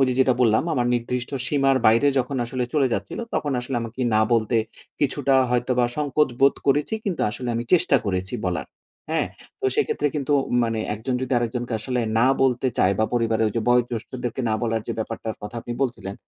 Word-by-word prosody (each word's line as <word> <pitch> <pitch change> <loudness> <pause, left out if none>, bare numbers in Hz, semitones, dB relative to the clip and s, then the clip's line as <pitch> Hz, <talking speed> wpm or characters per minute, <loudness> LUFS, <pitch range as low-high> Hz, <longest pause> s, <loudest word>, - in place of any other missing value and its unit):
ওইযে 130 -1 +3
যেটা 130 -1 +4
বললাম, 110 -3 +4
আমার 120 -2 +1
নির্দিষ্ট 120 +1 -2 0.2
সীমার 135 -2 +2
বাইরে 115 +6 +5
যখন 130 +2 -1
আসলে 125 +1 -2
চলে 140 -3 +4
যাচ্ছিলো, - - -3
তখন 145 -2 0
আসলে 125 +1 -3
আমাকে 115 +2 -7
না 110 - +4
বলতে 115 0 +2 0.4
কিছুটা 140 -1 +1 0.2
হয়তোবা 125 0 +1
সংকোচ 150 0 +1
বোধ 140 0 +5
করেছি। 145 +9 +2
কিন্তু 190 -4 -2
আসলে 125 +3 -5
আমি 115 - -2
চেষ্টা 160 -5 +5
করেছি 95 -1 -2
বলার। 90 -1 -2 0.4
হ্যাঁ? - - +1 0.3
তো - - -7
সেক্ষেত্রে 145 - 0
কিন্তু 145 -1 -1 0.3
মানে 115 -1 -1 0.2
একজন 110 +4 -3
যদি 130 0 -3
আরেকজনকে 120 +1 -3
আসলে 125 +1 -1 0.2
না 120 - +4 0.2
বলতে 130 0 +2
চায় 95 - +4
বা 110 - +3
পরিবারের 115 -2 +1
ওইযে 115 +1 -2
বয়োজ্যেষ্ঠদেরকে 120 +1 -1
না 110 - +1
বলার 115 -1 0
যে - - 0
ব্যাপারটার 110 0 -4
কথা 105 - -7
আপনি 120 - -6
বলছিলেন, 105 -7 -3
125 Hz, 185 wpm, -23 LUFS, 115-135 Hz, 0.4 s, বাইরে